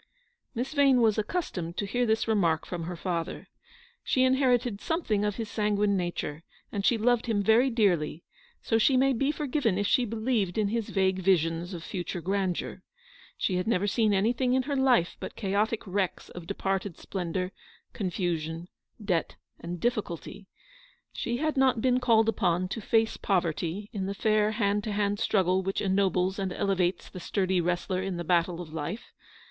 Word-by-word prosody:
Miss 255 Hz, +5 st, -3 dB
Vane 275 Hz, -3 st, +5 dB
was 220 Hz, -2 st, +3 dB
accustomed 200 Hz, -, -3 dB
to 205 Hz, -, -1 dB
hear 245 Hz, +4 st, 0 dB
this 220 Hz, +1 st, +1 dB
remark 175 Hz, -8 st, +2 dB
from 170 Hz, -2 st, -5 dB
her 175 Hz, +1 st, -4 dB
father. 170 Hz, -1 st, -4 dB, 0.5 s
She 260 Hz, -, +2 dB
inherited 250 Hz, -4 st, +2 dB
something 265 Hz, -, 0 dB
of 210 Hz, -1 st, 0 dB
his 225 Hz, -2 st, -4 dB
sanguine 210 Hz, -1 st, +1 dB
nature, 175 Hz, -4 st, -3 dB, 0.3 s
and 200 Hz, -, -3 dB
she 235 Hz, -, +3 dB
loved 240 Hz, +1 st, +2 dB
him 210 Hz, -3 st, +1 dB
very 230 Hz, +6 st, +4 dB
dearly, 175 Hz, -9 st, +1 dB, 0.4 s
so 225 Hz, -, +2 dB
she 255 Hz, +4 st, +4 dB
may 270 Hz, +1 st, +4 dB
be 275 Hz, +4 st, +1 dB
forgiven 285 Hz, -9 st, 0 dB
if 205 Hz, -, 0 dB
she 245 Hz, +4 st, +3 dB
believed 220 Hz, -4 st, -1 dB
in 210 Hz, -2 st, +2 dB
his 230 Hz, 0 st, -2 dB
vague 190 Hz, -1 st, +1 dB
visions 175 Hz, -1 st, +1 dB
of 165 Hz, -, -7 dB
future 180 Hz, -1 st, -4 dB
grandeur. 190 Hz, 0 st, -2 dB, 0.6 s
She 185 Hz, -, 0 dB
had 180 Hz, -, -2 dB
never 205 Hz, -4 st, +2 dB
seen 215 Hz, +1 st, +2 dB
anything 235 Hz, +6 st, +2 dB
in 260 Hz, -, +2 dB
her 285 Hz, +2 st, -2 dB
life 255 Hz, -10 st, +3 dB
but -, -, -7 dB
chaotic 210 Hz, +2 st, -1 dB
wrecks 190 Hz, -1 st, -2 dB
of 175 Hz, -2 st, -10 dB
departed 195 Hz, -1 st, -2 dB
splendour, 180 Hz, 0 st, -3 dB, 0.4 s
confusion, 175 Hz, -3 st, -3 dB, 0.3 s
debt, 190 Hz, -6 st, -1 dB, 0.2 s
and 175 Hz, +1 st, -6 dB
diffi 240 Hz, 0 st, +1 dB
culty. 195 Hz, +3 st, -9 dB, 0.7 s
She 240 Hz, 0 st, -2 dB
had 310 Hz, +2 st, -1 dB
not 265 Hz, -3 st, +3 dB
been 250 Hz, +1 st, +2 dB
called 225 Hz, -3 st, +4 dB
upon 180 Hz, -4 st, +1 dB
to 225 Hz, -, -4 dB
face 225 Hz, +2 st, +1 dB
poverty 180 Hz, +1 st, -1 dB
in 195 Hz, -3 st, -2 dB
the 200 Hz, -, -3 dB
fair 215 Hz, 0 st, +2 dB
hand 205 Hz, -1 st, +1 dB
to 215 Hz, -, -2 dB
hand 205 Hz, 0 st, 0 dB
struggle 190 Hz, -2 st, +2 dB
which 195 Hz, +1 st, -2 dB
ennobles 190 Hz, -1 st, +1 dB
and 190 Hz, -1 st, -2 dB
elevates 180 Hz, -1 st, 0 dB
the 185 Hz, -, -9 dB
sturdy 185 Hz, 0 st, 0 dB
wrestler 180 Hz, +2 st, -1 dB
in 190 Hz, -2 st, -3 dB
the 175 Hz, -, -3 dB
battle 175 Hz, 0 st, +1 dB
of 155 Hz, -3 st, -10 dB
life. 165 Hz, +8 st, -5 dB
200 Hz, 175 wpm, -28 LUFS, 180-230 Hz, 0.7 s, Vane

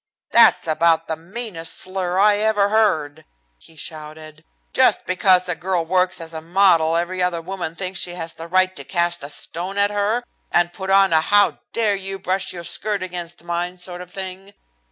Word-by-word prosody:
"That's -, -, +5 dB
about 165 Hz, +1 st, +2 dB
the 160 Hz, -, -3 dB
meanest 170 Hz, -1 st, -4 dB
slur 185 Hz, -1 st, -1 dB
I 205 Hz, +1 st, +4 dB
ever 210 Hz, -1 st, +2 dB
heard," 155 Hz, -9 st, +1 dB, 0.4 s
he 165 Hz, -, -16 dB
shouted. 155 Hz, 0 st, -9 dB, 0.3 s
"Just -, -, +4 dB
because 185 Hz, 0 st, +3 dB
a 180 Hz, -, 0 dB
girl 175 Hz, -1 st, -2 dB
works 185 Hz, +2 st, +1 dB
as 165 Hz, 0 st, -8 dB
a 160 Hz, -, -6 dB
model 165 Hz, -2 st, +3 dB
every 180 Hz, +2 st, -2 dB
other 180 Hz, -2 st, 0 dB
woman 170 Hz, -1 st, -6 dB
thinks 185 Hz, +1 st, -3 dB
she 175 Hz, 0 st, -1 dB
has 165 Hz, -2 st, -6 dB
the 165 Hz, -, -9 dB
right 185 Hz, +1 st, +2 dB
to 140 Hz, -, -5 dB
cast 175 Hz, +1 st, -1 dB
a 140 Hz, -, -6 dB
stone 175 Hz, +6 st, -2 dB
at 200 Hz, 0 st, +3 dB
her, 205 Hz, +4 st, 0 dB, 0.3 s
and 175 Hz, 0 st, +2 dB
put 190 Hz, 0 st, -6 dB
on 195 Hz, -2 st, +5 dB
a 160 Hz, -, +5 dB
how 205 Hz, +4 st, +3 dB
dare 220 Hz, -3 st, +2 dB
you 195 Hz, 0 st, -4 dB
brush 190 Hz, 0 st, -2 dB
your 175 Hz, -2 st, -8 dB
skirt 205 Hz, +2 st, -1 dB
against 175 Hz, -2 st, -7 dB
mine 175 Hz, +1 st, -3 dB
sort 180 Hz, 0 st, -6 dB
of 180 Hz, -, -10 dB
thing. 190 Hz, +1 st, -8 dB
180 Hz, 190 wpm, -21 LUFS, 165-195 Hz, 0.4 s, That's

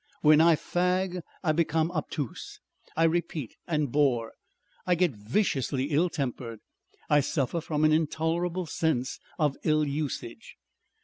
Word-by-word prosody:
When 155 Hz, 0 st, +6 dB
I 165 Hz, 0 st, +6 dB
fag 180 Hz, +2 st, 0 dB, 0.2 s
I 160 Hz, -, +3 dB
become 160 Hz, +1 st, +1 dB
obtuse, 155 Hz, -5 st, -5 dB, 0.4 s
I 165 Hz, -, +4 dB
repeat 165 Hz, -6 st, 0 dB
and 150 Hz, -5 st, 0 dB
bore, 125 Hz, -6 st, +2 dB, 0.6 s
I 180 Hz, -, +4 dB
get 175 Hz, -1 st, +2 dB
viciously 135 Hz, -, -1 dB
ill 165 Hz, +5 st, +3 dB
tempered, 125 Hz, -7 st, -4 dB, 0.5 s
I 150 Hz, -, +5 dB
suffer 145 Hz, +3 st, -1 dB
from 155 Hz, -1 st, -1 dB
an 155 Hz, -, +5 dB
intolerable 165 Hz, +3 st, 0 dB
sense 145 Hz, -5 st, -1 dB, 0.2 s
of 150 Hz, -3 st, +1 dB
ill 155 Hz, -1 st, +3 dB
usage. 145 Hz, -, -4 dB
155 Hz, 130 wpm, -28 LUFS, 140-170 Hz, 0.6 s, When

